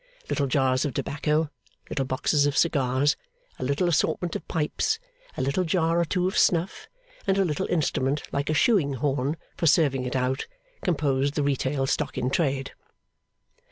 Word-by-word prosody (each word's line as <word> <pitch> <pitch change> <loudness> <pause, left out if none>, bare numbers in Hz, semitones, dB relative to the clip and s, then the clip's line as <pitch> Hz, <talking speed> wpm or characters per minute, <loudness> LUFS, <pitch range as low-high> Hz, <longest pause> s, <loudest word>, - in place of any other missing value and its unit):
Little 140 - 0
jars 130 -1 +2
of 140 -5 -3
tobacco, 150 +1 0 0.4
little 135 - -2
boxes 145 +3 +2
of 145 - -1
cigars, 140 -3 +2 0.4
a - - -3
little 140 +7 +1
assortment 175 +1 0
of - - -5
pipes, 165 - 0 0.4
a - - 0
little 140 +8 +1
jar 165 -1 +1
or - - +1
two 180 +2 0
of 190 - -3
snuff, 175 +2 +1 0.4
and 195 0 +3
a 195 - +3
little 150 -4 -1
instrument 145 -3 0
like 140 +1 -1
a 155 - +1
shoeing 165 - +3
horn 140 +3 -1 0.2
for 165 - +1
serving 140 -4 +3
it 125 - -3
out, 130 +1 0 0.3
composed 145 -4 0
the 145 - +1
retail 135 -1 0
stock - - -1
in 125 +1 0
trade. 135 -4 0
145 Hz, 165 wpm, -26 LUFS, 135-165 Hz, 0.4 s, and